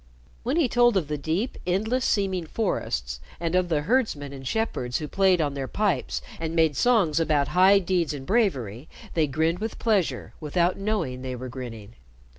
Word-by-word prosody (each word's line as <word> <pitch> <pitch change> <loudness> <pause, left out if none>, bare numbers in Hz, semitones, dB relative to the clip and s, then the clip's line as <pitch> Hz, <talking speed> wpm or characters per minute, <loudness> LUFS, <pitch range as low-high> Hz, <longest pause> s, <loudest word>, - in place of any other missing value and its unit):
When 260 +7 -1
he 325 -6 +4
told 240 -3 +4
of 160 -6 -1
the 150 - -1
deep 170 - -2
endless 220 +8 0
seeming 190 -5 0
forests, 60 - -2 0.2
and 165 0 -2
of 180 -1 +2
the 155 -3 +1
herdsmen 155 - 0
and 135 -1 -8
shepherds 130 - -1
who 155 - -4
played 190 +1 +3
on 145 -3 0
their 135 -1 -4
pipes 195 -9 -1 0.2
and 165 0 -3
made 160 -3 +3
songs 190 - +3
about 150 -3 +1
high 190 +2 +6
deeds 180 -4 0
and 140 -3 -6
bravery, 140 - 0 0.2
they 160 -3 +2
grinned 160 +5 0
with 220 +1 -4
pleasure 210 -7 0
without 170 +3 +1
knowing 195 -12 -2
they 130 -1 -4
were 130 +1 -6
grinning. 115 -4 -8
165 Hz, 180 wpm, -25 LUFS, 140-200 Hz, 0.2 s, high